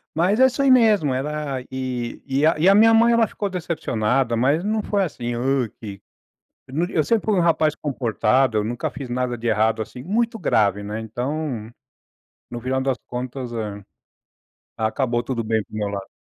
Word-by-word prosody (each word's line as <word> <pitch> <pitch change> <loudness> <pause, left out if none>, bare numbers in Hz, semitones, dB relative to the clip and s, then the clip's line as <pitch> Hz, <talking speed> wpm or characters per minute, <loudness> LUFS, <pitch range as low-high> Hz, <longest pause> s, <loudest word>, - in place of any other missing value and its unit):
Mas 185 +8 +2
é 260 - +7
isso 260 +2 -2
aí 270 - +5
mesmo. 210 - +4
Era 140 -1 -3
e 130 -2 -4
e 140 +2 +1 0.2
a 195 - +7
minha 225 +2 +6
mãe, 235 +1 +5
ela 230 -2 +4
ficou 205 0 -4
decepcionada. 135 - -1
Mas 140 +9 +2
não 215 +1 0
foi 200 -1 0
assim: 120 -8 -4
“Hã, 130 -1 0
que”. 100 -3 -8 0.7
Eu 130 - -10
não 170 +3 +1
di 190 - -9
eu 155 - +2
sempre 225 +6 +1
fui 215 -2 +2
um 180 - +3
rapaz 160 -2 +2
comportado. 125 -3 +1
Eu - - -1
nunca 120 +3 -3
fiz 135 -4 -7
nada 125 0 -1
de 120 - -4
errado, 110 0 +2
assim, 125 +3 -7
muito 225 +4 0
grave, 100 - +2
né? 105 +2 -4
Então, 125 0 -4 0.8
no 120 0 -5
final 130 +1 -1
das 130 -1 0
contas, 125 0 -5
eh, 105 -3 -5 1.0
acabou 120 +2 0
tudo 120 -2 -3
bem 110 0 0
pro - - -13
meu 105 -1 -1
lado. 100 -1 -5
130 Hz, 190 wpm, -22 LUFS, 115-170 Hz, 1.0 s, é